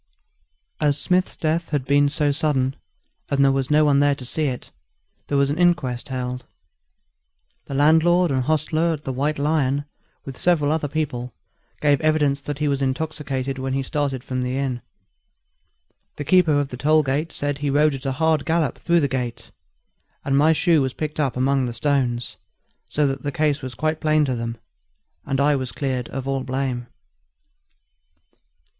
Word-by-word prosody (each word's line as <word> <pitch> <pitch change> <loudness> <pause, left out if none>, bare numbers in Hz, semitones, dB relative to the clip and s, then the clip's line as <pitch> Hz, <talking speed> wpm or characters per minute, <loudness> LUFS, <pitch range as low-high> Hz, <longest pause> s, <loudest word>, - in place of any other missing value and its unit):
As 145 -2 +2
Smith's 180 0 +1
death 165 +2 -1
had 145 -4 -1
been 145 +1 +3
so 150 0 +1
sudden, 140 -3 0 0.5
and 140 - 0
no 140 0 +5
one 140 +3 +2
was 140 - +4
there 145 0 +3
to 130 - -8
see 155 +5 -1
it, 130 -3 -4 0.6
there 145 - 0
was 140 0 +2
an 155 - -3
inquest 150 -8 +1
held. 125 -1 -4 1.2
The 140 - -6
landlord 160 +4 +4
and 130 -1 +1
hostler 155 +2 +1
at 150 -1 -7
the 135 - -3
White 145 +4 -1
Lion, 145 -1 +1 0.4
with 135 -2 -8
several 155 -5 +2
other 155 -1 0
people, 135 -5 -3 0.5
gave 145 -2 +3
evidence 150 -3 +2
that 145 0 -5
he 150 0 0
was 140 -1 0
intoxicated 135 -1 -2
when 130 0 -2
he 135 0 0
started 135 -2 -2
from 130 -1 -3
the 125 +1 -2
inn. 130 -3 -2 1.3
The 145 - -5
keeper 165 -3 +4
of 140 -1 -1
the 125 - -7
toll 155 +3 +3
gate 145 +4 -1
said 145 -1 -3
he 145 -1 -1
rode 150 +2 +3
at 135 - -6
a 135 - 0
hard 160 +1 +1
gallop 160 -2 0
through 170 -1 +2
the 140 - +2
gate; 120 -3 -4 0.7
and 135 - +1
my 150 +3 +5
shoe 160 -1 +3
was 130 -1 -1
picked 155 0 -4
up 135 -5 0
among 135 0 +2
the 120 - -4
stones, 125 -2 -1 0.5
so 150 - +1
that 135 -1 -1
the 145 - -3
case 150 0 0
was 130 -1 -7
quite 155 0 -1
plain 155 -1 +3
to 130 - -1
them, 115 0 -4 0.7
and 135 - -1
I 145 +1 +4
was 130 -2 -3
cleared 130 -4 -3
of 135 0 -5
all 135 -1 -1
blame. 130 -2 -2
140 Hz, 175 wpm, -22 LUFS, 130-155 Hz, 1.3 s, no